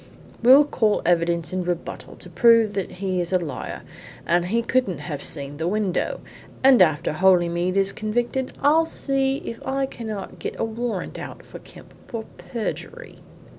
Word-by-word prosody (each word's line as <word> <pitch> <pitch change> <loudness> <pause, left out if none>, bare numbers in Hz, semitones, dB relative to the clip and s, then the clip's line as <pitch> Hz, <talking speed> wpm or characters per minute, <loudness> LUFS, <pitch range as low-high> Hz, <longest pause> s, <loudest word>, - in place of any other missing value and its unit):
We'll 265 +5 +8
call 220 -7 +1
evidence 170 0 +1
in 185 -1 -1
rebuttal 175 -1 -5
to 180 - -11
prove 230 +3 +5
that 195 -2 -3
he 185 -1 -2
is 175 - -4
a 185 - +4
liar 160 -7 -6 0.4
that 175 0 +2
he 230 +6 0
couldn't 245 -7 0
have 150 -5 -5
seen 145 -2 -3
the 160 +2 -2
window. 200 -1 -1 0.4
And 265 -5 +7
after 155 -4 +3
Holymead 175 +1 +2
is 195 0 +3
convicted 240 +4 -2
I'll 315 +3 +5
see 270 -3 0
if 230 - -6
I 270 +1 -1
cannot 220 -6 -7
get - - -5
a - - +1
warrant 225 -3 -4
out - - -9
for - - -11
Kemp - - -15
for 225 -2 -5
perjury." 360 - -6
200 Hz, 165 wpm, -23 LUFS, 175-240 Hz, 0.4 s, We'll